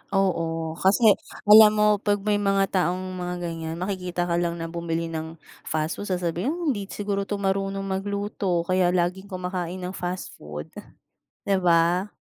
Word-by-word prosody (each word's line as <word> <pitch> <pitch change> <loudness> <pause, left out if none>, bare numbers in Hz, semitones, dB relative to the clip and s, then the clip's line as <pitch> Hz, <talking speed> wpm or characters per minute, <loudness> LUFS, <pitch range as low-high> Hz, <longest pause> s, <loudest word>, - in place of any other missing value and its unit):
Oo, 165 -4 0
kasi 205 +3 +5 0.3
alam 215 0 +10
mo 210 0 +4
pag 205 -1 0
may 210 0 +2
mga 195 -1 +1
taong 185 +1 -1
mga 180 0 -3
ganyan, 165 -1 -4
makikita 180 -1 -3
ka 170 - +1
lang 170 -1 0
na 165 0 -5
bumili 165 0 -3
ng 160 0 -5 0.3
fast 155 +1 0
food 205 - -5
sasabihin 180 - -1 0.2
hindi 205 -5 -3
siguro 200 -1 -2
'to 205 - -3
marunong 195 0 -1
magluto 195 -2 -2
kaya 180 0 +2
laging 180 +2 0
kumakain 180 -1 -4
ng 180 +1 -5
fast 180 +1 -3
food, 75 0 -8 0.8
di 200 -1 +2
ba? 175 +2 +3
185 Hz, 155 wpm, -25 LUFS, 170-195 Hz, 0.8 s, alam